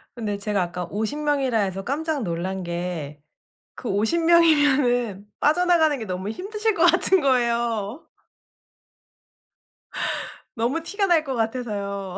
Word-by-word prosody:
근데 210 -4 -3
제가 200 -1 -1
아까 175 0 -3
50 220 +8 -3
명이라 280 -5 +1
해서 195 -1 -2
깜짝 295 0 -2
놀란 185 +2 -3
게 170 -4 -4 0.6
그 245 - -6
50 220 +12 +1
명이면은 285 - +3
빠져나가는 320 -1 +3
게 225 - -6
너무 185 +2 -4
힘드실 425 - -2
것 330 - +2
같은 360 +1 +4
거예요. 235 -2 0 2.5
너무 245 +8 -1
티가 400 +3 -1
날 330 -3 +4
것 265 -3 -4
같아서요. 200 -5 -3
235 Hz, 235 characters per minute, -23 LUFS, 200-310 Hz, 2.5 s, 같은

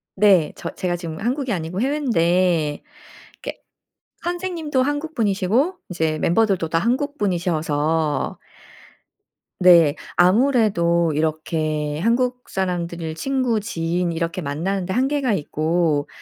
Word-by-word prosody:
네. 190 -6 +4
저 - - -6
제가 180 -1 -1
지금 165 -1 -6
한국이 250 +3 -1
아니고 170 +1 -3
해외인데 180 - +1 0.6
이게 - - -7 0.6
선생님도 345 -6 -1
한국 290 +3 -2
분이시고 225 - +1
이제 160 -3 -1
멤버들도 190 -1 +2
다 165 - +1
한국 275 - -1
분이셔서 160 - 0 1.2
네. 170 -5 +6 0.2
아무래도 180 - +3
이렇게 155 -1 -1
한국 250 +3 0
사람들을 170 -3 -3
친구 255 +3 0
지인 175 -3 -2
이렇게 170 +2 -2
만나는 175 +6 -2
데 190 - -3
한계가 265 -1 +1
있고 155 -2 0
180 Hz, 265 characters per minute, -21 LUFS, 165-245 Hz, 1.2 s, 네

